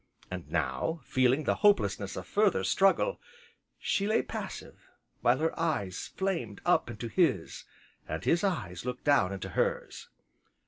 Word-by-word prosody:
And 90 -2 -6
now, 160 0 -1
feeling 130 +3 +2
the - - +1
hopelessness 105 - +3
of 90 - -6
further 200 - +2
struggle, 195 - +2 0.6
she 200 - 0
lay 220 - +2
passive, - - -7 0.3
while - - +4
her 160 +1 -1
eyes 105 - -1
flamed 165 - -2
up - - +3
into 115 +3 -5
his, 115 - 0 0.4
and 80 - -4
his 170 +3 +2
eyes 125 - -2
looked 125 0 -5
down 140 -10 +3
into 100 -1 -5
hers. - - -2
130 Hz, 140 wpm, -30 LUFS, -, 0.6 s, while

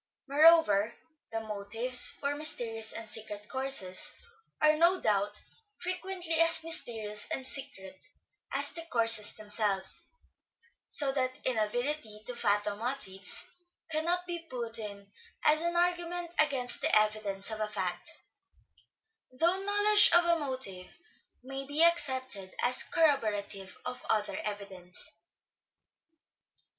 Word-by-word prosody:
Moreover, 280 -8 +4 0.4
the 225 0 -3
motives 220 +4 +4
for 280 0 -3
mysterious 230 -7 0
and 225 -1 -7
secret 210 -1 -6
courses 260 -9 -1 0.4
are, 305 0 +4
no 340 +4 +3
doubt, 205 -1 0 0.4
frequently 360 -2 -3
as 330 -1 +6
mysterious 225 -11 0
and 265 - -3
secret 190 -9 -6 0.5
as - - 0
the 335 - -6
courses 230 -3 +2
themselves, 210 - -1 0.8
so 280 -2 +2
that 255 -1 -1
inability 235 0 -2
to 250 - -6
fathom 205 -2 -1
motives 220 -6 +1 0.4
cannot 340 +3 0
be 345 -1 -5
put 245 -8 -7
in 200 -2 -8 0.4
as 310 +1 +4
an 340 +1 -1
argument 350 0 -1
against 270 -5 +2
the - - +4
evidence 210 -1 -1
of 220 - -5
a 215 - -1
fact: 210 - -4 1.2
though 335 +9 +1
knowledge 410 +1 +6
of 345 0 +6
a 340 -1 +2
motive 255 -11 -4 0.5
may 270 +1 -6
be 295 +3 +2
accepted 260 - +1
as 250 +1 +2
corroborative 210 - 0
of 250 0 -5
other 210 -1 -1
evidence. 195 -4 -4
250 Hz, 115 wpm, -30 LUFS, 210-320 Hz, 1.2 s, as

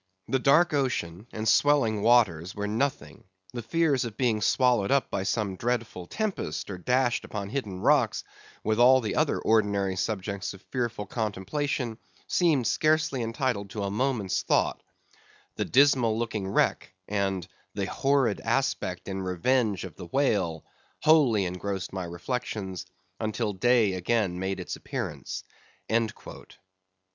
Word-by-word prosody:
"The 135 - +1
dark 150 +6 +4
ocean 115 - -1
and 110 0 -4
swelling 115 -5 +3
waters 100 -7 +3
were 105 -1 -3
nothing; 125 +7 -2 0.3
the 120 - -4
fears 150 +2 +1
of 115 -3 -6
being 115 -5 +1
swallowed 120 -1 +3
up 140 0 +2
by 100 - -1
some 100 0 -1
dreadful 115 -6 -2
tempest, 200 - -3
or 90 - -6
dashed 125 +4 +1
upon 100 -2 -5
hidden 105 -7 -4
rocks, 140 -5 +3 0.4
with 110 +1 0
all 130 +2 +7
the 110 -4 -3
other - - +2
ordinary 100 -3 +1
subjects 100 -1 -3
of 95 - -16
fearful 120 -5 -2
contemplation, 115 +4 -2 0.3
seemed 155 -9 +2
scarcely 155 +1 +2
entitled 115 -3 -2
to 105 0 -4
a 100 - -2
moment's 115 -4 0
thought; - - +1 0.7
the - - -1
dismal 130 -5 +4
looking 110 -4 -2
wreck, 95 -1 0
and 95 -3 -1 0.3
the 100 -1 -1
horrid 135 0 +1
aspect 115 -7 -1
and 95 -1 -3
revenge 105 +2 +1
of - - -9
the 85 - -8
whale, 95 - 0 0.4
wholly 140 -11 +5
engrossed 95 +1 -4
my 95 -2 -3
reflections, 95 0 -4 0.3
until 110 -1 -1
day 115 -1 +3
again 95 -1 0
made 95 0 -2
its 90 - -5
appearance." - - -5
110 Hz, 135 wpm, -27 LUFS, 95-130 Hz, 0.7 s, all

